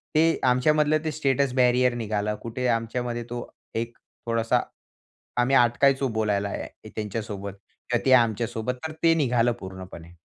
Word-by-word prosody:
ते 165 +1 +4
आमच्यामधलं 150 +4 +3
ते 155 - 0
status 140 -3 +1
barrier 125 -1 +4
निघालं. 105 -2 -2
कुठे 125 +2 -3
आमच्यामध्ये 120 +1 -1
तो 120 0 -5 0.3
एक 115 +1 -3 0.3
थोडासा 115 -1 +1 0.8
आम्ही 130 +3 +3
अटकायचो 135 +3 +4
बोलायला 105 -3 0
ह्या - - -4 0.3
त्यांच्यासोबत 105 -2 -4 0.4
किंवा 120 -1 +1
ते 130 - +5
आमच्यासोबत 115 0 +2
तर 160 - -6
ते 165 -1 +5
निघालं 120 -6 +2
पूर्णपणे. 95 -3 -10
120 Hz, 135 wpm, -25 LUFS, 110-130 Hz, 0.8 s, ते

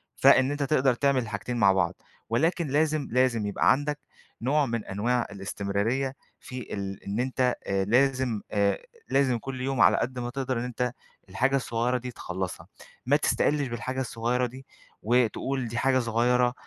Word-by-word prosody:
فإن 130 +2 +5
أنتَ 145 0 -1
تقدَر 135 -2 +3
تعمل 140 0 +2
الحاجتين 110 +3 -4
مع 100 -4 +5
بعض. 95 -3 +1 0.3
ولكن 160 +8 +1
لازم 150 +1 +1
لازم 125 -3 +2
يبقى 100 - +3
عندك 145 +1 0 0.4
نوع 145 +5 +2
من 115 -3 -3
أنواع 120 +5 0
الاستمراريَّة 100 +6 -2 0.3
في 125 -1 -8
ال 100 -1 -5
إن 100 +3 -3
أنتَ 125 0 +1
آآ 95 0 +1
لازِم 125 -1 +2
آآ 100 -2 +2 0.3
لازم 130 -2 +2
كلّ 130 0 -6
يوم، 135 -2 0
على - - +6
قد 125 +1 -2
ما 120 0 -3
تقدَر، 130 -1 -2
إن - - -3
أنتَ 125 0 -2 0.4
الحاجة 130 +9 +1
الصغيرة 120 -1 0
دي 125 0 -6
تخلَّصها. 95 -4 -5 0.4
ما 135 +4 +4
تستقِلِّش 145 -1 +1
بالحاجة 130 +2 -3
الصغيرة 120 +1 -1
دي 130 +2 -12 0.4
وتقول: 125 +2 +1
"دي 115 +1 -5
حاجة 130 +1 +3
صغيرة، 120 +1 +2
125 Hz, 160 wpm, -27 LUFS, 115-135 Hz, 0.4 s, على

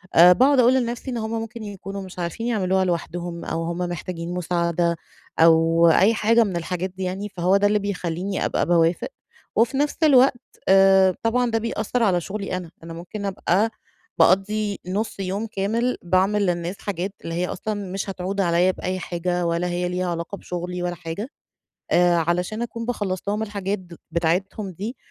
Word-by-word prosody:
آآ 175 +2 +9
باقعد 265 +5 +4
أقول 245 +1 +6
لنفسي 245 +1 -2
إن 240 - -3
هُم 220 0 -3
ممكن 225 0 -4
يكونوا 200 -1 -6
مش 185 -1 -10
عارفين 175 +7 -3
يعملوها 190 -4 +1
لوحدهم، 170 0 -3
أو 165 +1 -2
هُم 170 +1 -3
محتاجين 175 0 -4
مساعدة، 170 -1 0 0.4
أو 165 +1 +5
أي 195 +7 +5
حاجة 230 +1 +4
من 195 -4 -3
الحاجات 180 +2 -3
دي 185 +1 -7
يعني، 195 +3 -3
فهو 185 +1 +2
ده 205 +1 +3
اللي 210 0 +2
بيخليني 190 -1 -2
أبقى - - 0
باوافق، 170 0 +2 0.5
وفي 240 +4 +2
نفس 290 +1 0
الوقت 265 -3 +5 0.3
آآ 190 -1 +6
طبعًا 240 +1 +1
ده 225 - +1
بيأثر 230 +1 -1
على 180 -5 +2
شغلي 195 0 -4
أنا، 175 -2 -8
أنا 165 0 -8
ممكن 180 +5 -7
أبقى 195 +2 +1 0.5
باقضي 200 +4 +2
نص 205 +3 -3
يوم 195 +3 -2
كامل 225 +5 -1
باعمل 190 +3 +2
للناس 175 +2 -2
حاجات 195 0 -3
اللي 165 - -5
هي 180 +1 0
أصلًا 215 +4 -3 0.2
مش 195 0 -3
هتعود 190 +1 -2
عليّا 175 +1 +3
بأي 185 0 -4
حاجة، 175 0 -2
ولا 170 +1 0
هي 175 0 -1
ليها 180 0 -2
علاقة 170 +4 -4
بشغلي 180 0 -5
ولا 175 0 -2
حاجة. 180 +9 -6 0.6
آآ 175 0 +4
علشان 180 +7 0
أكون 230 -1 -5
باخلص 200 -6 -2
لهم 210 +2 0
الحاجات 205 -1 -3 0.3
بتاعتهم 185 +4 -1
دي، 210 +9 -6
190 Hz, 170 wpm, -23 LUFS, 175-215 Hz, 0.6 s, آآ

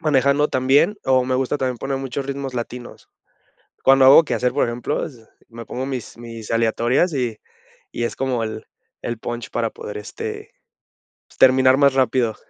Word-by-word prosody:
manejando 145 -1 +2
también, 135 +11 +2
o 130 -1 +3
me 130 - -1
gusta 130 +2 0
también 130 -2 -2
poner 135 +2 -3
muchos 135 +1 -4
ritmos 140 -1 -5
latinos. 120 0 -7 0.7
Cuando 135 0 +5
hago 140 +5 +8
quehacer, 125 -3 -1
por - - +1
ejemplo, 120 0 -2
es 115 -6 -12 0.2
me 115 0 -10
pongo 130 +4 -5
mis 130 -4 -6
mis 115 -2 -9
aleatorias 115 +8 +1
y 120 -5 -2 0.5
y 120 - -2
es - - -3
como 130 -3 -1
el 110 0 -6 0.4
el 120 -1 -4
punch 120 0 -6
para 115 -1 -1
poder, 105 - -8
este, 105 - -7 0.8
pues, - - -23
terminar 130 0 +5
más 140 -1 +4
rápido. 125 -3 +1
130 Hz, 170 wpm, -21 LUFS, 120-135 Hz, 0.8 s, hago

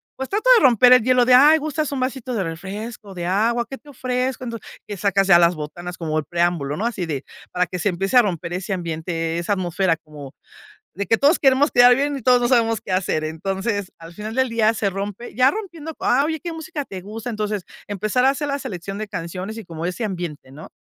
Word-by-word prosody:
pues, 265 0 -5
trato 435 +5 0
de - - +2
romper 250 0 +7
el 250 -3 +6
hielo 250 0 +4
de: 250 +1 +6
"Ay, 300 +5 +7
gustas 305 0 -2
un 280 - -3
vasito 255 -1 -3
de 210 -5 -1
refresco, 195 +5 -7
de 175 -1 -4
agua, 230 +6 +1
¿qué 270 - -6
te 295 - -18
ofrezco?". 255 -1 -2
Entonces, 230 -2 -7 0.2
que 205 - -6
sacas 195 0 +1
ya 185 -3 +8
las 170 0 +4
botanas 175 +4 -7
como 155 -2 -2
el 155 - -1
preámbulo, 170 -3 0
¿no?, 215 - -2
así 195 -7 -3
de 145 -4 -4 0.3
para 180 0 0
que 180 - -5
se 200 - +1
empiece 195 +6 0
a 245 - +8
romper 175 -4 -3
ese 185 +2 -3
ambiente, 165 -1 -3
esa 170 +4 -1
atmósfera 185 -2 0
como 150 -3 -12 0.6
de 200 +4 -3
que 225 - +3
todos 290 +7 +3
queremos 275 +2 +4
quedar 245 0 +7
bien, 285 +2 -1
y - - -8
todos 250 +1 +4
no 240 - +2
sabemos 225 -3 +2
qué - - -7
hacer. 185 -4 0
Entonces 195 +5 -3
al 165 +1 -11
final 215 +4 -7
del 260 -1 +2
día 225 -1 +2
se 215 -2 0
rompe 200 +4 -6
ya 255 +1 +5
rompiendo: 335 -7 -7
"Ah 275 - +3
oye 320 0 -2
¿qué 345 - -4
música 320 -2 -5
te 190 - -7
gusta?". 220 +5 -7
Entonces 210 -3 -3 0.2
empezar 215 +5 0
a - - +6
hacer 290 +1 -3
la 280 0 -1
selección 195 -3 -6
de 215 0 -4
canciones, 185 +6 -5
y 225 - -7
como 165 -1 -6
ese 180 +6 -3
ambiente 175 -9 -6
¿no?, 150 +4 -11
205 Hz, 235 wpm, -21 LUFS, 175-250 Hz, 0.6 s, ya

